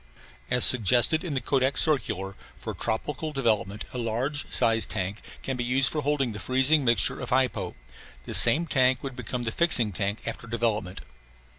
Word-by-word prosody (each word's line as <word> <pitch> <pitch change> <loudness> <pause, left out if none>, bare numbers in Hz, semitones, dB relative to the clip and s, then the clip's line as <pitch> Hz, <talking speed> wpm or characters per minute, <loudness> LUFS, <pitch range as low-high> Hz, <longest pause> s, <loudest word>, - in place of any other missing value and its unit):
As 125 -1 +3
suggested 125 - +3
in 165 -6 -4
the - - 0
Kodak 135 +2 0
circular, 100 - +1 0.2
for - - -7
tropical 150 +7 -4
development 110 -7 -2
a 125 - -5
large 120 +6 -3
size 115 0 +4
tank 95 +4 -4 0.2
can 135 - -3
be 125 - -3
used 130 +2 +1
for 150 - -2
holding 140 -3 -1
the 105 - -8
freezing 130 +4 +3
mixture 120 -2 +1
of - - -6
hypo. 130 0 -1 0.5
This - - +4
same 170 +3 +5
tank 130 -4 +1
would 135 -2 -6
become 125 0 -5
the 110 - -3
fixing 125 -8 +1
tank 100 +3 -3
after 115 +1 -6
development. 110 -5 -3
125 Hz, 170 wpm, -25 LUFS, 110-135 Hz, 0.5 s, same